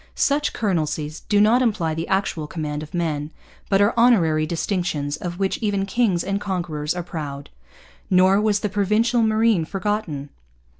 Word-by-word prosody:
Such 285 +1 +1
'colonelcies' 155 -6 -2
do 205 - +4
not 220 +5 +5
imply 200 -10 0
the 160 +1 -4
actual 190 -5 -1
command 150 -2 -4
of 155 +3 -8
men, 155 -4 -2 0.4
but 195 0 +4
are 205 - +2
honorary 170 -11 +3
distinctions 165 -4 -2
of 175 +2 -6
which 195 0 -1
even 200 -3 0
kings 195 -4 +1
and 195 +1 -2
conquerors 170 -5 -2
are 175 - -3
proud. 145 -5 -6 0.6
Nor 190 +2 +4
was 210 -1 +1
the - - 0
Provincial 215 +4 +1
Marine 220 -4 +3
forgotten. 185 -6 -3
185 Hz, 155 wpm, -22 LUFS, 155-210 Hz, 0.6 s, not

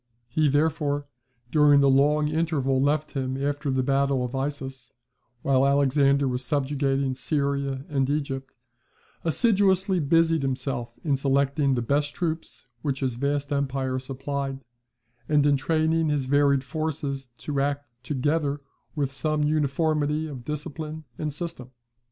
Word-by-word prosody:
He, 155 -1 +2
therefore, 145 0 +1 0.5
during 150 -2 +6
the 140 - +5
long 145 +3 +4
interval 150 -4 +1
left 150 +2 +1
him 130 -2 -2
after 145 +1 -2
the 130 -1 +1
battle 135 -1 +1
of 125 - -6
Issus, 135 -2 -4 0.5
while 135 -1 +3
Alexander 140 0 +3
was 125 0 -2
subjugating 135 -1 0
Syria 140 -1 -1
and 135 -2 0
Egypt, 135 -2 -2 0.7
assiduously 190 0 +2
busied 165 +1 +3
himself 130 -2 -3
in 145 -4 +1
selecting 140 0 +2
the 120 - -1
best 145 +4 0
troops 160 -2 -4 0.2
which 140 -2 -2
his 130 -2 0
vast 140 +3 -1
empire 135 -2 -1
supplied, 135 +1 -4 0.7
and 150 -1 +4
in 145 -1 +4
training 160 +2 +1
his 145 -3 0
varied 140 0 +3
forces 140 -2 -3
to 145 -2 -3
act 145 0 -1 0.2
together 145 +2 0 0.4
with 140 -3 -1
some 150 +3 0
uniformity 150 +1 +1
of 135 -6 -7
discipline 150 +2 -5 0.2
and 155 -1 -2
system. 145 -5 -6
140 Hz, 135 wpm, -26 LUFS, 135-150 Hz, 0.7 s, during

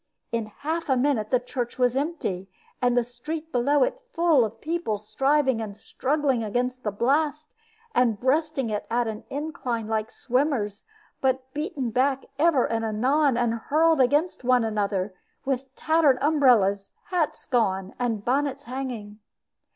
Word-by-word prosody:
In 230 -2 -1
half 315 +9 -4
a 265 - +3
minute 250 -5 +1
the 250 - +3
church 245 -1 -4
was 250 -1 +2
empty, 270 - -2 0.3
and 245 -1 +2
the 245 - +4
street 305 +7 -6
below 270 +3 +3
it - - -2
full 330 - +4
of 225 0 -4
people, 320 -9 -2
striving 260 +4 +1
and 210 -2 -6
struggling 270 0 0
against 250 +4 -2
the 210 - 0
blast, 295 +8 0 0.4
and 230 -5 +2
breasting 270 -2 +1
it 210 - -3
at 240 0 +1
an 215 -1 -5
incline 265 -6 -3
like 220 -1 -1
swimmers, 250 -6 -1 0.4
but 260 0 0
beaten 295 - -3
back 265 +3 +1
ever 305 -5 +4
and 225 0 -1
anon 255 +5 +2
and 240 -2 +1
hurled 310 +6 +2
against 290 +5 +2
one 250 -1 +4
another, 205 -3 -1 0.3
with 265 0 -2
tattered 315 -4 +3
umbrellas, 240 -10 +3 0.2
hats 345 -4 -1
gone, 195 -6 0
and 230 -4 -1
bonnets 280 +2 0
hanging. 235 -5 -6
255 Hz, 150 wpm, -25 LUFS, 225-290 Hz, 0.4 s, the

